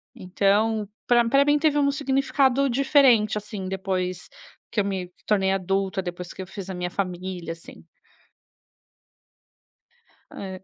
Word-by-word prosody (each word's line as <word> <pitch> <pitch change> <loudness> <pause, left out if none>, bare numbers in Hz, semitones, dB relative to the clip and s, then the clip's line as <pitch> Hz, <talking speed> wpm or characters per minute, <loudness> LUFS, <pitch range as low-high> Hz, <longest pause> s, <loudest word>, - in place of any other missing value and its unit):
Então, 205 +3 +1 0.2
para 240 -1 +4
para 275 +3 +5
mim 290 +1 +4
teve 300 -1 +2
um 280 -1 +3
significado 275 -1 +1
diferente 255 -5 +4
assim 210 -2 -5
depois 185 -1 -3 0.4
que 225 - -1
eu - - -3
me 190 -2 -3 0.2
tornei 195 -2 +2
adulta, 195 0 -1
depois 175 0 -6
que - - -8
eu 185 - -7
fiz 195 0 -8
a - - -4
minha 180 0 -3
família 180 -2 -4
assim. 165 - -13 2.5
Hã. 190 -1 -7
195 Hz, 135 wpm, -24 LUFS, 185-250 Hz, 2.5 s, para